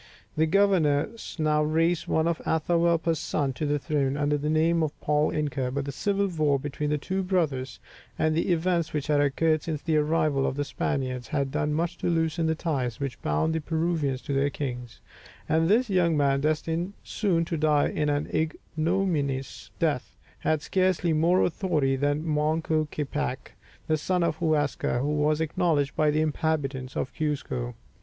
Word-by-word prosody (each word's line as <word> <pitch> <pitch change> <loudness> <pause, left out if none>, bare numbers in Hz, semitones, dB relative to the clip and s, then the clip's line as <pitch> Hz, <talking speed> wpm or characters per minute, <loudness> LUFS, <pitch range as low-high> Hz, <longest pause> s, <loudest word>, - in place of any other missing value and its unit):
The 160 +1 +2
governor 170 -6 +3 0.3
now 155 -1 +2
raised 165 +2 +1
one 160 +1 +1
of 170 -2 0
Atahualpa's 165 0 +1
sons 140 -4 -1
to 150 - -1
the 145 0 +1
throne, 140 -1 -1
under 145 0 +1
the 145 +1 -2
name 165 +2 +2
of 155 -2 -2
Paul 150 0 +2
Inca; 145 -4 -1
but 140 +2 -3
the 140 - -3
civil 200 +7 0
war 155 -6 +1
between 145 +2 -3
the 150 - +1
two 190 +6 -2
brothers, 155 - -1 0.4
and 155 0 +2
the 170 +2 +1
events 170 -1 +1
which 150 -2 -1
had 145 -1 +2
occurred 155 +2 +2
since 155 -2 -3
the 160 -2 +1
arrival 150 -2 +1
of - - -2
the 145 0 -1
Spaniards, 130 -3 -2
had 140 -4 -1
done 150 +2 0
much 170 +2 -2
to - - -1
loosen 165 0 +1
the 160 - +1
ties 135 -8 -2
which 140 -3 -4
bound 75 - 0
the 160 - -1
Peruvians 160 -4 -1
to 140 - -3
their 140 +1 +2
kings, 125 -5 -6 0.5
and 160 +1 +2
this 235 +5 +4
young 175 -5 +2
man, 140 -1 +2
destined 160 +4 -1
soon 175 -6 0
to 165 - -3
die 150 -2 +2
an 150 -1 -1 0.2
ignominious 155 -3 -1
death, - - -1 0.2
had 155 -2 0
scarcely 185 -3 +1
more 170 +4 +3
authority 155 -7 +1
than 145 +3 0
Manco 155 +1 +1
Capac, 145 -2 -4 0.3
the 155 - +1
son 180 +3 0
of 165 -2 0
Huascar, 150 -6 0
who 145 +4 0
was 150 +1 +2
acknowledged 160 -3 0
by 155 -1 +3
the 150 +1 +2
inhabitants 145 -4 -1
of 130 - -2
Cuzco. 135 -6 -3
155 Hz, 175 wpm, -27 LUFS, 145-165 Hz, 0.5 s, this